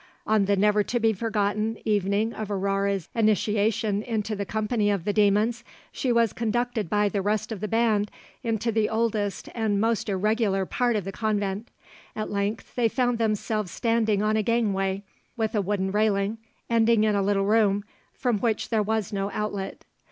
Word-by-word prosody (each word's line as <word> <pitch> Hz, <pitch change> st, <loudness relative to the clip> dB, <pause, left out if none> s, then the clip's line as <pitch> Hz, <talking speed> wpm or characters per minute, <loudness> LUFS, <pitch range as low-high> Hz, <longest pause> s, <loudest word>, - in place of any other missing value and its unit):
On 215 Hz, -2 st, +3 dB
the 200 Hz, +1 st, +2 dB
never 210 Hz, +1 st, +3 dB
to 240 Hz, +4 st, -1 dB
be 225 Hz, -1 st, +3 dB
forgotten 215 Hz, 0 st, -1 dB
evening 205 Hz, +2 st, +1 dB
of 215 Hz, -2 st, -5 dB
Aurore's 195 Hz, -2 st, 0 dB
initiation 215 Hz, -1 st, +1 dB
into 220 Hz, -2 st, -2 dB
the 200 Hz, -1 st, -4 dB
company 215 Hz, 0 st, 0 dB
of 200 Hz, -5 st, -1 dB
the 205 Hz, -, 0 dB
demons, 215 Hz, +3 st, +2 dB, 0.3 s
she 255 Hz, -, -1 dB
was 230 Hz, -3 st, +3 dB
conducted 230 Hz, -3 st, -1 dB
by 210 Hz, +1 st, +2 dB
the 200 Hz, -1 st, -1 dB
rest 215 Hz, +2 st, -1 dB
of 215 Hz, -, -4 dB
the 215 Hz, -, -3 dB
band 220 Hz, -2 st, +2 dB, 0.3 s
into 230 Hz, 0 st, -1 dB
the 220 Hz, -1 st, +1 dB
oldest 220 Hz, -3 st, -1 dB
and 220 Hz, -3 st, 0 dB
most 225 Hz, 0 st, 0 dB
irregular 200 Hz, 0 st, +1 dB
part 240 Hz, +4 st, 0 dB
of 210 Hz, -, 0 dB
the 195 Hz, -, -4 dB
convent. 205 Hz, 0 st, -2 dB, 0.5 s
At 215 Hz, -, -4 dB
length 200 Hz, +2 st, -2 dB
they 235 Hz, -2 st, +2 dB
found 245 Hz, 0 st, 0 dB
themselves 215 Hz, -2 st, 0 dB
standing 220 Hz, -1 st, +1 dB
on 215 Hz, 0 st, +2 dB
a 220 Hz, -, +2 dB
gangway 200 Hz, -4 st, 0 dB, 0.3 s
with 220 Hz, -2 st, -1 dB
a 210 Hz, -, +2 dB
wooden 190 Hz, -1 st, -1 dB
railing, 210 Hz, +1 st, +1 dB, 0.3 s
ending 230 Hz, -1 st, +3 dB
in 215 Hz, -1 st, +3 dB
a 200 Hz, -, +2 dB
little 195 Hz, 0 st, +1 dB
room, 205 Hz, -1 st, +3 dB, 0.3 s
from 245 Hz, -5 st, -1 dB
which 225 Hz, -2 st, -1 dB
there 220 Hz, -2 st, +2 dB
was 215 Hz, -1 st, -1 dB
no 195 Hz, 0 st, -1 dB
outlet. 205 Hz, -2 st, -4 dB
215 Hz, 175 wpm, -26 LUFS, 200-225 Hz, 0.5 s, On